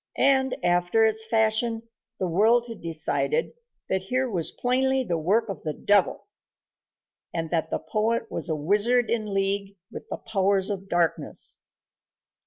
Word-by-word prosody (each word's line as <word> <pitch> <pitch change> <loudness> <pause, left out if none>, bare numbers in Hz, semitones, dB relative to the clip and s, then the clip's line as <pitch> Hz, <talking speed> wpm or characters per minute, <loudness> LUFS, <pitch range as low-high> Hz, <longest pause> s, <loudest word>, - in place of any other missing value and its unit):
And, 265 -1 +2
after 175 +5 +3
its 220 0 0
fashion, 225 +1 +1 0.4
the 185 - 0
world 220 +7 +3
had 230 -2 -9
decided 165 - 0 0.3
that 190 0 0
here 255 +7 -1
was 170 -8 0
plainly 265 +1 0
the 170 -8 -2
work 210 +8 +1
of 195 - -6
the 155 - -3
devil, 205 +3 +1 1.1
and 165 -1 -4
that 160 -2 0
the - - -1
poet 225 +1 -2
was 165 - -2
a 160 - 0
wizard 210 +10 +2
in 215 -3 -1
league 195 0 -1
with - - -9
the - - -4
powers 195 -1 0
of 195 -1 -6
darkness. 170 -2 +1
205 Hz, 150 wpm, -25 LUFS, 175-230 Hz, 1.1 s, after